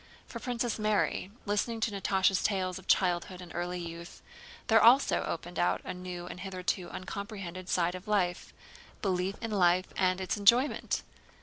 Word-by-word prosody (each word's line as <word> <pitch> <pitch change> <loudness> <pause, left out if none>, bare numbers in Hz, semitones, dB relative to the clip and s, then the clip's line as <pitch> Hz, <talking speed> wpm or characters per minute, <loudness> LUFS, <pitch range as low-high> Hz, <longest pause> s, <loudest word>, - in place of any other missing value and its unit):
For - - -8
Princess 240 -3 -2
Mary, 215 -3 +1 0.2
listening 215 +3 0
to 220 - +1
Natásha's 195 -1 +2
tales 185 -2 0
of - - -17
childhood 180 0 +2
and 175 -2 -10
early 180 +1 -3
youth, 170 0 -8 0.4
there 225 -2 +5
also 245 +5 +6
opened - - -4
out - - +2
a - - -5
new 180 -1 -6
and 180 - -8
hitherto 185 -1 -3
uncomprehended 185 -2 -6
side 175 0 +1
of 185 +3 -8
life: 185 -4 0 0.5
belief 190 0 0
in 225 - -3
life 185 -2 +3
and 185 0 +2
its 190 +2 -2
enjoyment. 235 +7 +3
185 Hz, 155 wpm, -30 LUFS, 180-210 Hz, 0.5 s, also